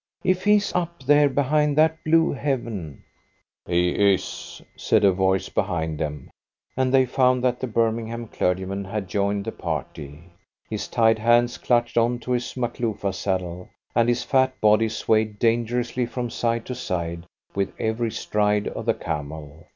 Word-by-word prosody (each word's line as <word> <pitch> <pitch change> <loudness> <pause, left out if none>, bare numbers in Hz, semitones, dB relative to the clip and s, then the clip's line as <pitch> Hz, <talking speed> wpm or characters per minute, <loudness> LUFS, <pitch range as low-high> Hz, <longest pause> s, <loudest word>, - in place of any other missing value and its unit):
If 185 +1 +1
He's 210 0 +3
up 170 -5 -2
there 145 +1 +5
behind 145 +2 +1
that 160 +1 +3
blue 165 +1 +3
heaven 115 - -3 0.3
" - - -47
"He 90 0 +2 0.2
is," 95 - -6 0.2
said 110 -1 +2
a 100 - +6
voice 95 0 +1
behind 80 -3 -2
them, 75 -3 -5 0.4
and 130 0 +1
they 130 -1 +5
found 125 0 +2
that 125 -1 +1
the 130 - -3
Birmingham 115 0 -1
clergyman 95 +1 -1
had 100 0 -4
joined 100 +2 -1
the - - -3
party. 75 +1 -6 0.4
His 110 -2 -4
tied 115 -2 +3
hands 120 +2 +3
clutched 120 -1 +2
on 120 +1 +1
to 125 - -5
his 120 -1 -1
Makloofa 115 -5 -2
saddle, 90 -1 -3 0.2
and 115 0 +3
his 120 0 +1
fat 130 -1 +1
body 110 +1 +4
swayed 110 -1 0
dangerously 120 +2 0
from 120 -1 -4
side 115 0 -1
to 125 - -4
side 85 -7 -4 0.3
with 100 -1 -1
every 110 +1 -1
stride 105 -1 0
of - - -7
the - - +3
camel. 75 +2 -6
115 Hz, 160 wpm, -24 LUFS, 95-125 Hz, 0.4 s, a